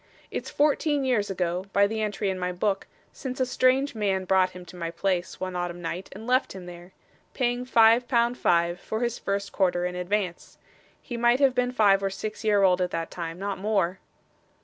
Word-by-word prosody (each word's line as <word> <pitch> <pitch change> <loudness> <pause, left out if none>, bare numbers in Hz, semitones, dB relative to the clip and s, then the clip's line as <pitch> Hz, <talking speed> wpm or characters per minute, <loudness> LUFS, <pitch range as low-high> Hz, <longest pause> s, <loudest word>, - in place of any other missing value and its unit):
'It's - - -4
fourteen 295 -1 +1
years 230 -6 +1
ago, 180 -1 -2
by 200 0 +5
the 220 +2 -2
entry 205 -2 -1
in 185 - -4
my 180 0 -1
book, 195 +2 -1 0.3
since 260 -1 -6
a 260 - +3
strange 260 +2 +2
man 195 -4 -1
brought 185 0 +3
him 180 -1 -11
to 180 - -13
my 170 -2 -4
place, 175 +1 -2
one 185 -1 -4
autumn 175 0 -3
night, 175 +2 -5
and 215 +3 -9
left 255 +2 +1
him 190 -2 -9
there; 175 +1 -11 0.4
paying 245 -1 0
five 230 0 +5
pound 240 -1 +2
five, 170 -4 +1
for 220 +4 -4
his 240 -1 -1
first 200 0 -2
quarter 180 -2 +1
in 180 - -2
advance. 180 0 -3 0.5
He 240 - -5
might 240 +2 +3
have 275 -2 +4
been 250 0 +1
five 205 -5 +4
or 195 - 0
six 215 +4 -6
year 205 -2 +3
old 185 -1 +4
at 180 - +1
that 165 -1 -4
time 165 -1 -5
not 200 0 -4
more. 195 -3 0
200 Hz, 205 wpm, -26 LUFS, 180-235 Hz, 0.5 s, by